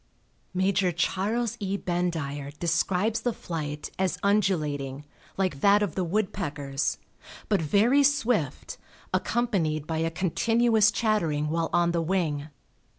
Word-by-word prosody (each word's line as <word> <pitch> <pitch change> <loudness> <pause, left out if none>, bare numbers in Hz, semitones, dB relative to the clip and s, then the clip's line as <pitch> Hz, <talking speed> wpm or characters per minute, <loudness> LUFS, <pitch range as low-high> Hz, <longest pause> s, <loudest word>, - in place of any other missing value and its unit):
Major 190 0 +1
Charles 200 +6 -1
E. 200 0 -2
Bendire 160 -6 -3
describes 185 +7 0
the 245 - 0
flight 150 -5 -5
as 185 -1 0
undulating, 150 -9 0 0.3
like 185 -8 -1
that 205 +1 +5
of 200 - -2
the 185 - -1
woodpeckers, 165 -7 -2 0.5
but 205 -5 +2
very 215 - +4
swift, 245 - 0 0.3
accompanied 170 -11 0
by 160 0 -2
a 165 0 +1
continuous 220 +5 +2
chattering 170 -9 0
while 165 0 0
on 175 0 +3
the 170 -1 0
wing. 160 -4 -1
180 Hz, 120 wpm, -27 LUFS, 155-205 Hz, 0.5 s, that